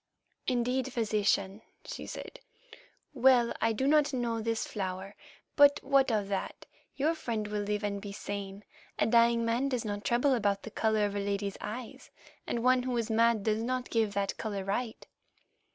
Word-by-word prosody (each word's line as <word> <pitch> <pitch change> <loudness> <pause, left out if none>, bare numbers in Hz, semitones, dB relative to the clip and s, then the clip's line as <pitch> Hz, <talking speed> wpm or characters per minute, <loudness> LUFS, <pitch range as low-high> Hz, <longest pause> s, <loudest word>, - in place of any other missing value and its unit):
"Indeed, 250 +1 0
Physician," 210 -3 0 0.2
she - - -7
said. - - -8 0.7
"Well, 250 -2 +4
I 225 - +3
do 225 +5 -1
not 295 0 +3
know 235 -3 -1
this 225 0 -1
flower, 190 0 -5 0.4
but 285 0 +6
what 270 -2 +3
of 210 -3 0
that? 195 -1 -4 0.3
Your 300 +4 +1
friend 230 -9 -3
will 210 0 -2
live 210 +1 -2
and 200 -1 -2
be 205 -1 -7
sane. 200 0 -6 0.3
A - - +2
dying 235 0 +4
man 240 +4 +1
does 250 -4 -2
not 205 -1 -3
trouble 250 +3 +2
about 200 -4 0
the 220 - -8
colour 220 -1 +1
of 205 0 -3
a - - 0
lady's 200 0 -2
eyes, 235 +3 -7 0.4
and 235 - -2
one 255 0 +4
who 250 -1 -2
is 230 -1 -1
mad 230 -1 +3
does 215 +1 +1
not 250 +1 -2
give 220 -3 +1
that 200 -1 -1
colour 205 -3 -3
right." 220 +4 -3
225 Hz, 175 wpm, -30 LUFS, 205-250 Hz, 0.7 s, but